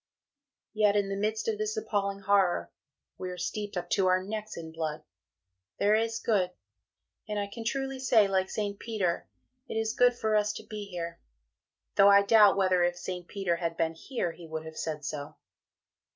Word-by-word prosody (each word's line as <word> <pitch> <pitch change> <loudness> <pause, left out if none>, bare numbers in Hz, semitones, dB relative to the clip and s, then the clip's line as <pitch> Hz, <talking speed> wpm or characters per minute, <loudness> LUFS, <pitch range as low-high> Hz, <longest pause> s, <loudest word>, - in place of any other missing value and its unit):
Yet 210 -2 +3
in 200 -1 +1
the 195 - -2
midst 215 +2 -1
of 215 -2 -1
this 215 +1 -2
appalling 200 -2 -1
Horror 195 -2 +2 0.5
(we 185 - -4
are 180 - -6
steeped 205 +2 -4
up 175 - -3
to 190 -2 +3
our 185 0 +3
necks 215 +2 -5
in 160 -1 -7
blood) 160 -1 -4 0.7
there 205 +1 +3
is 225 +1 +1
good, 200 -7 +1 0.8
and 210 - -2
I 205 - 0
can 215 +3 -8
truly 270 +3 -2
say, 230 -5 +4
like 190 -1 +1
St. 205 -1 -3
Peter, 200 -7 -1 0.4
"It - - -4
is 220 0 0
good 245 0 +4
for 220 -2 0
us 210 0 +2
to - - -8
be 210 -2 -6
here" 170 -3 -6 0.8
though 200 0 +8
I 200 0 +7
doubt 210 -1 +6
whether 185 -2 +3
if 175 0 +1
St. 180 -1 -5
Peter 195 -4 -1
had 165 -1 -3
been 165 -1 +1
here, 175 +1 -3
he 170 0 -12
would 160 0 -5
have 160 0 -9
said 155 -2 -4
so. 145 -1 -5
200 Hz, 190 wpm, -29 LUFS, 175-215 Hz, 0.8 s, though